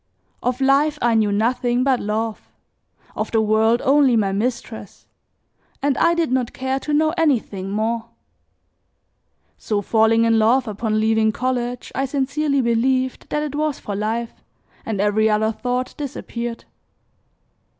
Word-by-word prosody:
Of 250 +1 -1
life 285 +3 +3
I 240 -1 +2
knew 215 -2 +2
nothing 240 +3 +1
but 265 -2 +2
love, 215 +1 -3 0.7
of - - -3
the 225 - +1
world 220 +2 +2
only 275 -2 +4
my 205 -3 +1
mistress, 230 +5 -4 0.7
and 280 -1 +1
I 340 0 +3
did 330 -5 0
not 255 -2 0
care 265 +1 -2
to 300 - -5
know 310 +2 +2
anything 220 -11 0
more. 225 +3 -1 1.5
So 205 -2 -2
falling 225 +2 +3
in 225 -1 +3
love 240 +3 +3
upon 215 +1 -1
leaving 220 0 +2
college 245 0 -3
I 270 - -1
sincerely 280 +1 0
believed 255 +2 0
that 300 - -1
it 295 -2 -4
was 300 -1 -1
for 205 - -6
life 225 +3 -3 0.5
and 215 -3 -2
every 210 +2 +2
other 215 +1 +2
thought 250 +3 -3
disappeared. 240 -5 -5
235 Hz, 140 wpm, -21 LUFS, 220-265 Hz, 1.5 s, only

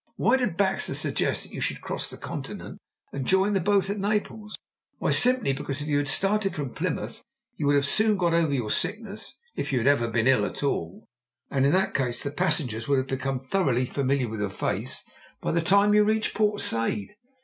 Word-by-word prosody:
Why - - +3
did 210 -10 -1
Baxter 195 -1 +1
suggest - - 0
that - - -12
you - - -5
should - - -1
cross - - -3
the - - -8
Continent - - -7 0.3
and 140 - -3
join 190 +7 +2
the 195 - +2
boat 195 +1 +2
at 200 +1 -3
Naples? 210 +1 -2 0.4
Why, - - 0
simply 250 - +4
because 135 0 -4
if 145 - -5
you 145 -1 +1
had 145 - -2
started 195 +6 +1
from 145 -5 -4
Plymouth - - -3 0.3
you 145 - -2
would 140 -1 +3
soon 215 +9 +2
have 210 - +2
got 175 -2 +1
over 165 -3 +2
your 120 -6 -1
sickness, 210 0 -2 0.2
if - - -3
you 130 - +1
had 120 - 0
ever 140 -5 +3
been 115 0 0
ill 130 -5 +4
at 105 - -4
all, 90 -11 -2 0.5
and 135 0 +2
in - - +3
that 190 +1 +2
case 125 -3 -1
the 140 - -3
passengers 150 - 0
would 140 -1 +3
have 130 - 0
become 135 0 -2
thoroughly 130 -3 0
familiar 135 -1 0
with 110 -1 -6
your 105 -1 -1
face 100 - -3 0.3
by - - -2
the 170 - +1
time 200 +4 +4
you 210 0 +6
reached 215 +1 0
Port 210 -1 +1
Said. 115 -3 0
145 Hz, 215 wpm, -26 LUFS, 130-200 Hz, 0.5 s, you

